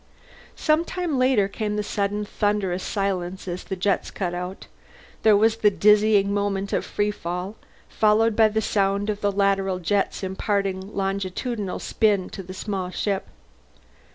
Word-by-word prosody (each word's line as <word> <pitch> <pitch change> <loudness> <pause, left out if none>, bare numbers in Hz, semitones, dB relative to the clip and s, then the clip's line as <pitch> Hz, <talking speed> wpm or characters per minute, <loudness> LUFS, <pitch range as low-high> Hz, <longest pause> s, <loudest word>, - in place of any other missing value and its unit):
Some 310 +1 +2
time 340 -6 -2
later 255 -6 +3
came 210 +1 -3
the 210 - -1
sudden 205 0 -1
thunderous 205 -3 -1
silence 190 -2 -2
as 175 0 -4
the 190 - -4
jets 195 +1 0
cut 180 -3 -3
out; 180 +2 -5 0.6
there 215 -2 +6
was 220 +2 +3
the 215 -2 +4
dizzying 205 0 +4
moment 200 -1 -1
of - - +1
free 210 0 -1
fall, 180 +1 -5 0.3
followed 220 +1 +3
by 220 0 +6
the 220 +1 0
sound 200 +1 +1
of 205 0 -6
the 205 - +2
lateral 195 -1 +1
jets 195 +3 -1
imparting 190 0 -2
longitudinal 195 +2 -2
spin 205 -4 +1
to - - -6
the 185 0 -9
small 190 -2 -3
ship. 195 +1 -2
200 Hz, 155 wpm, -24 LUFS, 190-210 Hz, 0.6 s, there